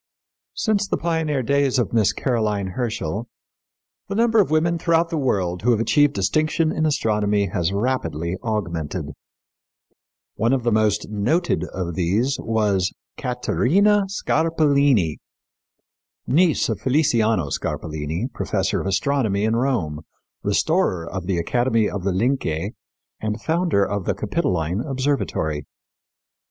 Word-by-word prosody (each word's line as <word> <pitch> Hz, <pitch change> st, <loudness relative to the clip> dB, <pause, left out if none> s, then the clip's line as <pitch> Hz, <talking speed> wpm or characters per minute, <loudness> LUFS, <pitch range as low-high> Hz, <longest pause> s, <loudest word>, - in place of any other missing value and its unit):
Since 205 Hz, -3 st, +1 dB
the -, -, 0 dB
pioneer 160 Hz, -5 st, -1 dB
days 140 Hz, +1 st, +2 dB
of 120 Hz, -, 0 dB
Miss 110 Hz, -4 st, +3 dB
Caroline 105 Hz, -6 st, -1 dB
Herschel, 110 Hz, -1 st, -3 dB, 0.8 s
the 195 Hz, -, -4 dB
number 225 Hz, 0 st, +3 dB
of 195 Hz, -, 0 dB
women 165 Hz, +2 st, +1 dB
throughout 165 Hz, +1 st, +2 dB
the -, -, -1 dB
world 90 Hz, -9 st, 0 dB
who 120 Hz, -, +1 dB
have 115 Hz, -3 st, +3 dB
achieved 145 Hz, +5 st, +3 dB
distinction 155 Hz, -, +1 dB
in 155 Hz, 0 st, 0 dB
astronomy 105 Hz, -7 st, +1 dB
has 85 Hz, 0 st, -1 dB
rapidly 95 Hz, -, -1 dB
augmented. 85 Hz, -7 st, -3 dB, 1.2 s
One 115 Hz, +5 st, +1 dB
of 130 Hz, -3 st, 0 dB
the 120 Hz, -, +1 dB
most 105 Hz, -1 st, +1 dB
noted 155 Hz, -, 0 dB
of 90 Hz, -2 st, -4 dB
these 100 Hz, -, 0 dB
was 105 Hz, -4 st, +1 dB, 0.2 s
Caterina 180 Hz, +11 st, +2 dB
Scarpellini, 145 Hz, -, +2 dB, 1.1 s
niece 165 Hz, +2 st, +3 dB
of -, -, -3 dB
Feliciano 115 Hz, -, +2 dB
Scarpellini, 80 Hz, -, -3 dB
professor -, -, -1 dB
of -, -, -4 dB
astronomy 105 Hz, 0 st, +1 dB
in 110 Hz, +1 st, +1 dB
Rome, 115 Hz, -, -1 dB, 0.4 s
restorer 100 Hz, -, +1 dB
of 90 Hz, 0 st, -5 dB
the 95 Hz, -3 st, 0 dB
Academy 115 Hz, +5 st, +1 dB
of 100 Hz, -3 st, -4 dB
the 100 Hz, -, +1 dB
Lyncei, 95 Hz, -, 0 dB, 0.5 s
and 110 Hz, 0 st, -3 dB
founder 160 Hz, -, +1 dB
of 100 Hz, -2 st, -3 dB
the -, -, 0 dB
Capitoline 95 Hz, -, -1 dB
Observatory. 125 Hz, -, -2 dB
115 Hz, 125 wpm, -22 LUFS, 95-145 Hz, 1.2 s, Miss